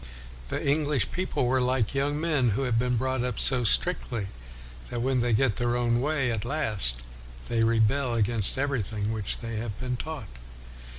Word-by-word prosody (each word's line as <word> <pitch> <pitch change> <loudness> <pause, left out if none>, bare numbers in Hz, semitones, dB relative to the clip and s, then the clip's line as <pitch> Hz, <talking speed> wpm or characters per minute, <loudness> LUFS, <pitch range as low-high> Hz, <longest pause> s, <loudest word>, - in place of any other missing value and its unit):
The - - -3
English 145 -2 +1
people 185 -8 -1
were 130 +1 +2
like 125 -2 0
young 145 +2 0
men 150 -7 +1
who 135 - 0
have 120 -3 +1
been 125 0 +1
brought 130 +1 -1
up 125 -3 -3
so 125 -2 +4
strictly 115 - +3 0.6
that 120 - -3
when 130 0 +1
they 120 0 +1
get 115 -1 +2
their 120 0 0
own 120 0 +1
way 140 -3 0
at 110 -3 -2
last 110 - -2 0.5
they 115 -1 +2
rebel 115 +3 +2
against 110 -1 0
everything 110 -6 -1
which 110 -3 -4
they 115 -2 -4
have 110 -2 -5
been 125 -1 -3
taught. 120 - -7
120 Hz, 175 wpm, -27 LUFS, 115-135 Hz, 0.6 s, so